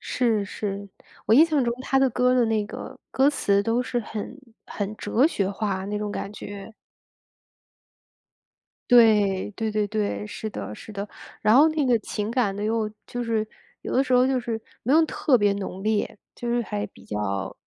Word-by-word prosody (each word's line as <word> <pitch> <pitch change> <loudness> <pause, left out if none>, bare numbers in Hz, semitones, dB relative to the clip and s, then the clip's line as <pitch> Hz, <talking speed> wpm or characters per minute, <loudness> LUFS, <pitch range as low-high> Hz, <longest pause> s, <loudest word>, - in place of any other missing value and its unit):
是 225 -5 0
是， 200 0 -5 0.4
我 220 - +5
印 305 - +8
象 300 -6 +1
中 235 - 0
他 270 0 +2
的 270 0 +4
歌 250 +2 +2
的 245 - +4
那 220 -2 +1
个 - - -8
歌 270 +2 +4
词 200 -8 +2
都 230 +4 +1
是 250 -1 -2
很 215 +3 -6 0.3
很 205 0 -4
哲 225 +7 +2
学 200 - -1
化 195 -2 -2
那 210 +1 -2
种 210 0 -3
感 200 - -5
觉。 205 +1 -8 2.2
对， 210 -5 +5
对 220 +2 -3
对 210 -1 0
对， 210 0 -2
是 215 +1 -5
的 145 - -6
是 215 - -10
的。 200 +1 -4 0.3
然 215 +1 +4
后 295 +4 +7
那 310 -2 0
个 245 -3 +3
情 210 +1 -4
感 225 -6 +1
呢 205 - -4
又 220 0 0 0.2
就 245 - -5
是 225 -2 0 0.4
有 - - -5
的 260 - +4
时 255 - -1
候 250 0 +6
就 265 -1 +1
是 230 -2 -4 0.2
没 255 - +2
有 320 +1 +6
特 280 -3 +2
别 205 -2 +3
浓 195 -1 -5
烈， 215 -1 0 0.2
就 240 - -5
是 240 0 +1
还 105 - -3
比 - - -18
较， 100 -2 -3
220 Hz, 205 characters per minute, -25 LUFS, 205-245 Hz, 2.2 s, 印